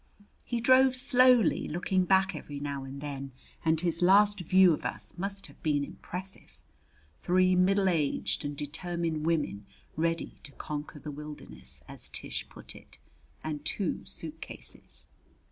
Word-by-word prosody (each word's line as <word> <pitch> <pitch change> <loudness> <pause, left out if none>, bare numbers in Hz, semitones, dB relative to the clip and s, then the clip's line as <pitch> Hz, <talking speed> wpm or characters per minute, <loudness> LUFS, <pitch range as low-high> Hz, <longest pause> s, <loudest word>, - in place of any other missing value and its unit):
He 240 - -2
drove 260 +2 +6
slowly, 255 - +4
looking 185 +3 +1
back 190 +1 +4
every 145 -1 -6
now 140 -1 -3
and 135 +1 -8
then, 140 -2 -5 0.3
and 160 -1 +3
his 170 0 -1
last 200 +3 +6
view 185 0 +6
of - - -4
us - - -5
must 195 +2 -2
have - - -14
been 145 -3 +1
impressive 185 +6 -5 0.6
three 185 +1 +3
middle 195 +2 +4
aged 160 -5 0
and 145 -1 -4
determined 160 +1 -2
women 145 -12 0 0.3
ready 165 +1 -1
to 140 - -11
conquer 150 +1 -6
the 150 +1 -7
wilderness, 145 - -8
as - - -2
Tish - - -4
put - - -8
it, - - -14 0.5
and 150 -2 -4
two 185 +3 -1
suitcases. 160 -2 -6
165 Hz, 145 wpm, -30 LUFS, 150-190 Hz, 0.6 s, drove